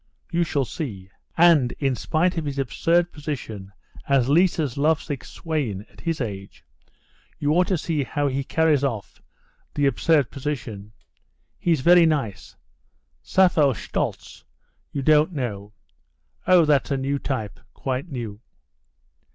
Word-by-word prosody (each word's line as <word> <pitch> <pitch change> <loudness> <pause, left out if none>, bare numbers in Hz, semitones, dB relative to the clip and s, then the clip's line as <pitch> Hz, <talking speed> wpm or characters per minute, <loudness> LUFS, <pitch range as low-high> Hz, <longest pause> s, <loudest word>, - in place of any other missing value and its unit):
You 170 0 +2
shall 145 -4 -1
see. 100 - -6 0.3
And, 160 -7 +5
in 135 -2 -1
spite 170 +7 0
of 165 -3 -2
his 140 -1 -4
absurd 170 +6 +1
position 115 -10 -6 0.4
as 135 -2 +3
Liza's 160 -4 +2
lovesick 150 -1 0
swain 135 - -4
at - - -16
his 165 -2 -2
age, 100 -5 -6 0.7
you 145 0 0
ought 180 +3 +3
to 190 -3 +1
see 155 -2 -1
how 145 +2 -1
he 135 0 -1
carries 155 -1 +2
off 115 -7 -4 0.5
the 145 - +1
absurd 145 0 +2
position. 115 -8 -5 0.7
He's 165 -6 +1
very 175 +2 +6
nice. 135 -11 -2 0.7
Sappho 165 - +3
Shtoltz - - -4 0.5
you 140 - -3
don't 155 +4 +4
know? 105 -8 -4 0.8
Oh, 180 -3 +6
that's 145 -4 +2
a 140 - 0
new 140 +1 -1
type, 120 -9 -4 0.2
quite 130 +5 -3
new." 115 -6 -5
140 Hz, 135 wpm, -23 LUFS, 125-160 Hz, 0.8 s, very